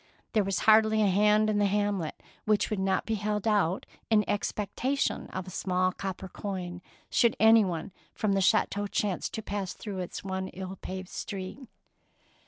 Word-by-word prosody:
There 215 -3 +3
was 195 0 -1
hardly 220 0 +5
a - - +4
hand 210 +3 +4
in 210 -1 +1
the 205 - +3
hamlet 200 -5 -1 0.2
which 215 0 +2
would 210 - -1
not 190 -1 +1
be 225 - -1
held 210 0 -1
out 200 -4 +2 0.2
in 210 -2 +3
expectation 215 +7 -1
of 185 -1 -5
a 185 - -9
small 185 0 +1
copper 190 0 -5
coin, 180 -2 -5 0.3
should 235 -2 +4
anyone 210 -5 +4 0.2
from 210 -2 +1
the 195 - +2
chateau 205 +2 +2
chance 200 -2 -1
to 220 - -6
pass 200 -3 -3
through 200 -4 -6
its 180 - -5
one 190 -1 -3
ill 190 0 -7
paved 185 0 -6
street. 190 +4 -6
200 Hz, 170 wpm, -29 LUFS, 190-215 Hz, 0.3 s, hardly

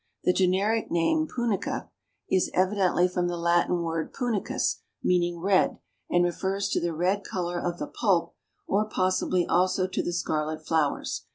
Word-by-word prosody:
The 180 - +3
generic 195 +5 +1
name 315 - +1
Punica 235 -7 -2 0.4
is 185 - +2
evidently 185 -1 +3
from 180 -1 -1
the 175 0 -2
Latin 170 +1 +2
word 165 -1 -2
punicus, 240 -6 -1 0.3
meaning 175 -1 +1
red, 190 +2 +2 0.3
and 175 0 +3
refers 195 +3 -1
to - - 0
the 170 - -1
red 185 +5 +1
color 175 -2 -3
of 175 -1 -2
the - - -3
pulp 190 -1 0 0.3
or 210 +2 0
possibly 185 -2 +1
also 185 +1 +2
to 185 - -2
the - - -2
scarlet 155 -2 -2
flowers. 155 -3 -1
180 Hz, 155 wpm, -27 LUFS, 175-195 Hz, 0.4 s, The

